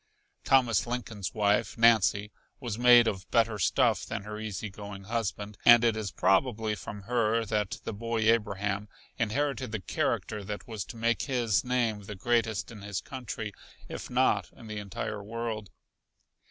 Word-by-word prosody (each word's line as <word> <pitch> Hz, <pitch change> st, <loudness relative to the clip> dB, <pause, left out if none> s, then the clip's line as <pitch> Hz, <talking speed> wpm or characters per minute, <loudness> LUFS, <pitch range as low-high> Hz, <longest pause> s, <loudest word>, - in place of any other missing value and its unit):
Thomas 125 Hz, -5 st, +3 dB
Lincoln's 115 Hz, -5 st, -4 dB
wife, 105 Hz, +1 st, +1 dB
Nancy, 110 Hz, -2 st, +4 dB, 0.3 s
was 120 Hz, -4 st, -4 dB
made 120 Hz, -1 st, +7 dB
of 95 Hz, -4 st, -3 dB
better 115 Hz, -2 st, +2 dB
stuff 85 Hz, -, +2 dB
than 100 Hz, -, -5 dB
her 105 Hz, +1 st, -6 dB
easy 110 Hz, -1 st, -4 dB
going 100 Hz, -1 st, -8 dB
husband, 105 Hz, -1 st, -3 dB
and 120 Hz, 0 st, +8 dB
it 115 Hz, -2 st, +3 dB
is 110 Hz, -2 st, -3 dB
probably 110 Hz, +2 st, +2 dB
from 105 Hz, -1 st, -7 dB
her 115 Hz, 0 st, +1 dB
that 105 Hz, -2 st, -1 dB
the -, -, -4 dB
boy 115 Hz, +2 st, -2 dB
Abraham 105 Hz, -2 st, +1 dB, 0.3 s
inherited 130 Hz, +2 st, -1 dB
the 110 Hz, -, -2 dB
character 105 Hz, +2 st, -2 dB
that 105 Hz, +1 st, -6 dB
was 110 Hz, -4 st, -4 dB
to 115 Hz, -, -10 dB
make 115 Hz, +1 st, +1 dB
his 120 Hz, -7 st, +1 dB
name 120 Hz, -4 st, 0 dB
the 105 Hz, -, -7 dB
greatest 110 Hz, -2 st, 0 dB
in 105 Hz, -3 st, -10 dB
his 100 Hz, -1 st, -3 dB
country, 115 Hz, -5 st, -6 dB, 0.3 s
if -, -, -7 dB
not -, -, +2 dB
in 115 Hz, -, -14 dB
the 105 Hz, -1 st, -5 dB
entire 105 Hz, +1 st, -5 dB
world. 110 Hz, -1 st, -4 dB
110 Hz, 160 wpm, -29 LUFS, 105-115 Hz, 0.3 s, and